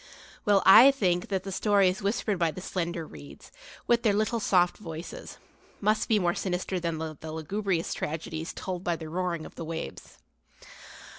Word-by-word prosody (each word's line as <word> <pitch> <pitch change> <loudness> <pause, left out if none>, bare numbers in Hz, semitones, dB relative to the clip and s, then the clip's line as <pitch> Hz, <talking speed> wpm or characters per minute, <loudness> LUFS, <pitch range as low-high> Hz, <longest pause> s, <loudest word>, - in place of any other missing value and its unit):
Well, 200 -2 +4
I 225 +8 +10
think 185 -10 +1
that 190 -2 -2
the 195 - -6
stories 195 -1 +2
whispered 200 -1 -1
by 170 -2 +2
the 160 - -7
slender 170 -2 -3
reeds, 70 - -13 0.3
with 235 -1 +3
their 215 -4 +2
little 215 +2 0
soft 180 -4 +2
voices, 165 -4 -8 0.4
must 215 +1 +1
be 220 - +4
more 175 -3 +1
sinister 185 0 -2
than 165 -2 -2
the 160 0 -6
lugubrious 170 +3 -2
tragedies 160 +1 -4
told 185 -1 -5
by 175 -2 0
the 160 -1 -8
roaring 175 -1 -2
of - - -11
the - - -7
waves. 160 - -7
180 Hz, 165 wpm, -28 LUFS, 165-200 Hz, 0.4 s, I